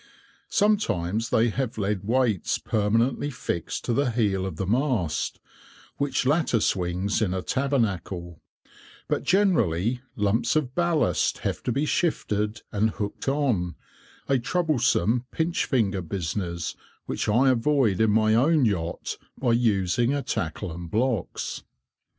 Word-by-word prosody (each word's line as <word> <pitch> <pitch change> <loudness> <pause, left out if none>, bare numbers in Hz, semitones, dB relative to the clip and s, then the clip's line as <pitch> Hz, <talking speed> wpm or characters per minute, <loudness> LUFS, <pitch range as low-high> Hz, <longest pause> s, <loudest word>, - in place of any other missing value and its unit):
Sometimes 115 - +1
they 115 +1 +3
have 125 0 -3
lead 100 -1 -1
weights 115 -3 +1
permanently 115 +7 +1
fixed 85 - -4
to 120 - 0
the 140 +2 +2
heel 100 -5 0
of 90 - -5
the 95 - -3
mast 115 - 0 0.6
(which 140 -2 0
latter 145 -4 +2
swings 95 +2 0
in 95 -4 +1
a 95 - -3
tabernacle), 100 - -1 0.7
but - - 0
generally, 120 - +2
lumps 115 +5 +1
of 140 -5 0
ballast 165 - +1
have - - -1
to - - -2
be 140 +5 0
shifted 105 - -1
and 105 +2 +2
hooked 105 +2 -5
on, 125 -12 0 0.5
a 135 -2 +2
troublesome 125 - +1
"pinch 165 +4 0
finger" 100 -7 +1
business 85 -1 -3 0.3
which - - -2
I 130 +5 +4
avoid 125 -5 +2
in 110 - +4
my 110 +1 +3
own 140 +4 +4
yacht 85 -6 -2 0.2
by 125 -3 +1
using 115 +2 +2
a 140 - -2
tackle 85 +3 -3
and 85 0 -7
blocks. 115 0 -1
115 Hz, 135 wpm, -25 LUFS, 95-135 Hz, 0.7 s, I